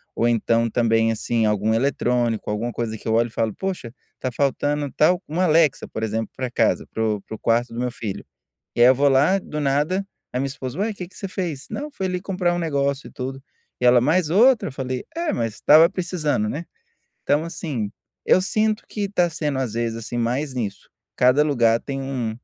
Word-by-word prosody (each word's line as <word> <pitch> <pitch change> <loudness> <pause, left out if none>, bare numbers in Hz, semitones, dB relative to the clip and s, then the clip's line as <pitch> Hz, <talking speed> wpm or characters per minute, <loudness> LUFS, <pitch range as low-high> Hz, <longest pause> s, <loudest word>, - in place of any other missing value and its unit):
ou 120 - +2
então 115 0 +2
também, 115 -1 +2
assim, 115 +1 0
algum 105 +1 +1
eletrônico, 120 -3 0
alguma 110 +3 -2
coisa 115 -2 -3
que - - -11
eu 110 - +1
olho 115 +1 +3
e - - -12
falo 115 -2 -1
poxa, 185 -12 -4 0.3
tá 130 - -2
faltando 145 +2 0
tal 175 +4 +4
uma 170 +5 0
Alexa 160 -4 +3
por 110 - -6
exemplo 110 0 -2
para 130 -2 -3
casa, - - +1
para 110 - -2
o 105 -2 0
para 110 - -8
o - - -13
quarto 120 +1 +1
do 115 - -5
meu 125 - -1
filho. 110 -5 -6 0.5
E 120 - +1
aí 120 - +9
eu 130 - +7
vou 140 +2 +3
lá 145 +9 +4
do 150 -4 -6
nada, 150 +8 +1 0.3
a 125 - -1
minha 140 - 0
esposa: 130 +1 -6
"Ué 215 +2 0
que 180 -3 -7
que 190 - -22
você 195 - -5
fez?". 170 -7 -4
"Não, 295 +1 -4
foi 195 -9 -4
ali 180 0 -2
comprar 180 -3 0
um 175 - -1
negócio 140 -4 -1
e - - -13
tudo". 135 +1 -6 0.4
E - - +2
ela: 125 0 +7
"Mais 155 +5 +2
outra?". 230 +8 +5
Eu - - -9
falei: 130 -1 -4
"É, 340 0 0
mas 115 -2 -2
estava 160 +3 +6
precisando, 170 - -1
né?". 155 +9 -4 0.6
Então 145 +2 +1
assim, 150 -11 -4 0.3
eu 185 - +5
sinto 215 +2 0
que 210 - -4
está 180 -4 +1
sendo 150 -3 -2
às 120 -4 -3
vezes, 115 -1 -1
assim, 115 +1 -5
mais 130 +5 -1
nisso, 110 -6 -5 0.3
cada 125 +4 +4
lugar 120 -6 +3
tem 135 -1 -5
um 130 -4 -2
135 Hz, 215 wpm, -22 LUFS, 115-165 Hz, 0.6 s, aí